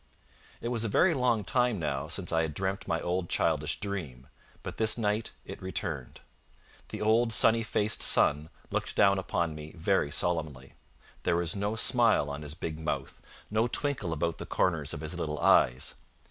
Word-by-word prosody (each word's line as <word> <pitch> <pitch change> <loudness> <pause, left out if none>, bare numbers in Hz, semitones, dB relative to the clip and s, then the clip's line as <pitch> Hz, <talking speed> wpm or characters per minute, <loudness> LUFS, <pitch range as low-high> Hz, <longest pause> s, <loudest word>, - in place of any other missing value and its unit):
It 120 - -3
was 120 -2 -1
a - - 0
very 170 - +4
long 125 -6 +1
time 120 +3 +1
now 75 -3 -2
since 90 +3 -4
I 80 -1 +2
had 80 -3 -3
dreamt 95 +1 -2
my 80 - 0
old 90 0 -2
childish - - 0
dream; 80 -12 -5 0.4
but - - -6
this 110 0 +2
night 110 0 -1
it - - -9
returned. 85 - -4 0.7
The - - -5
old 115 +2 +3
sunny 115 0 +4
faced 110 -1 0
sun 75 +2 +4 0.2
looked - - -2
down 100 -1 +4
upon 85 -3 -1
me 75 0 -9
very 85 -2 +1
solemnly. 75 -5 -2 0.5
There - - +1
was 85 0 0
no 100 +2 -1
smile 110 - +3
on 70 +1 -6
his 75 0 -6
big 80 -3 -5
mouth, 80 - -4 0.3
no 110 +2 +2
twinkle 125 - -2
about 85 +1 -2
the - - -6
corners 80 -6 0
of 75 - -7
his 80 +1 -3
little 80 -3 -3
eyes. 65 -3 +4
90 Hz, 175 wpm, -29 LUFS, 75-110 Hz, 0.7 s, very